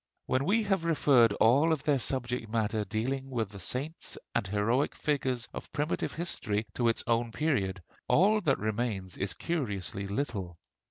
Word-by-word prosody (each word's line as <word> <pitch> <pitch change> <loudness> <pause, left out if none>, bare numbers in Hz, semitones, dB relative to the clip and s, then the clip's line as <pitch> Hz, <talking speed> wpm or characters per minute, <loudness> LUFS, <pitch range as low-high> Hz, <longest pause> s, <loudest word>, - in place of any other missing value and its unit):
When 130 +2 +1
we 215 +6 +3
have 195 -4 +1
referred 140 -8 +4
all 135 +10 +4
of 155 -4 0
their 145 -3 +2
subject 125 -1 -1
matter 110 -1 0
dealing 130 +7 -2
with 115 -5 -2
the 100 - -9
saints 135 - -2 0.2
and 95 - 0
heroic 110 +8 +1
figures 130 -5 -1
of - - -8
primitive 145 +3 -1
history 110 -11 -1
to 120 - +1
its 115 - +1
own 115 0 +1
period, 105 - -1 0.2
all 210 +5 +4
that 140 -7 +2
remains 105 -3 -2
is 100 +1 -2
curiously 105 - -2
little. 100 - -3
120 Hz, 160 wpm, -30 LUFS, 105-145 Hz, 0.2 s, referred